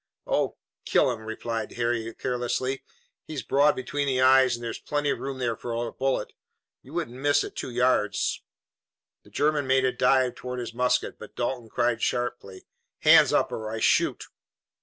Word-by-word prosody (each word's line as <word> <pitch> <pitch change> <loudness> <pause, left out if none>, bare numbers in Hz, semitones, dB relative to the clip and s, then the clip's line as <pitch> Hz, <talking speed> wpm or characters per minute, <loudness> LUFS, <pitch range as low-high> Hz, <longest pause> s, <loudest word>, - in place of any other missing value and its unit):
"Oh, - - 0 0.3
kill - - +3
him," 115 - -5
replied 110 0 -4
Harry 115 -1 -1
carelessly. 125 +2 -2 0.4
"He's 145 -6 -5
broad 145 +5 +3
between 140 +3 -2
the 130 -2 +1
eyes 130 -1 +5
and 120 - -10
there's 115 - -4
plenty 145 -1 -1
of - - -3
room 135 -1 -5
there 120 -3 -1
for 120 +1 -6
a 115 0 -3
bullet. 135 0 -1 0.5
You 135 - -15
couldn't 135 -7 -4
miss 145 0 +3
at - - -8
two - - -4
yards." 125 -4 +1 0.8
The - - -20
German 145 -2 +1
made 130 0 +3
a 130 - +2
dive 125 -1 +2
toward 125 0 -6
his 120 -2 -5
musket, 125 +1 0
but - - -11
Dalton 120 -1 -3
cried 120 +1 0
sharply: 120 -6 -3 0.4
"Hands - - +7
up - - +2
or 110 -1 -4
I 110 0 -4
shoot!" - - +2
125 Hz, 175 wpm, -26 LUFS, 120-135 Hz, 0.8 s, Hands